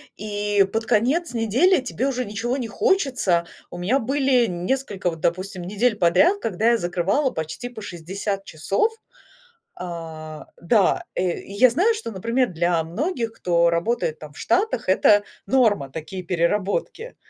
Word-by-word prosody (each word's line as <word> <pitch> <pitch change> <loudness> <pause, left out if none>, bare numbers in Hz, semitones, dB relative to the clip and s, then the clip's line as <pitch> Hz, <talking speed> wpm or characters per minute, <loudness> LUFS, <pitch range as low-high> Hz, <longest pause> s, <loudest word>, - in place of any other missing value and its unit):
и 205 -1 +1
под 225 +1 -1
конец 265 +10 +1
недели 255 - +3
тебе 260 +1 -2
уже 255 -2 -1
ничего 225 +4 -3
не 245 -4 -4
хочется. 265 - +1 0.2
У - - -8
меня 210 +11 +1
были 265 0 +2
несколько 195 +1 -2
вот, 165 -1 -7
допустим, 185 +2 -2
недель 210 +5 0
подряд, 195 - +4
когда 220 - +1
я 235 - +3
закрывала 190 - 0
почти 160 +10 -5
по 240 -3 -10
60 195 +2 -5
часов. 195 - 0 0.8
А, 160 -3 -7
да, 195 +2 +2
э, 180 -1 -1
и - - -12
я 250 +6 +5
знаю, 370 - +2
что 440 - -5
например 230 +6 0
для 170 -1 0
многих, 230 - -3
кто 170 -5 +2
работает 170 -2 -1
там 150 -1 -11
в - - -15
Штатах- 385 - 0
это 205 +2 +5 0.2
норма, 205 - +2
такие 180 +5 -7
переработки. 195 - -1
205 Hz, 150 wpm, -23 LUFS, 175-250 Hz, 0.8 s, я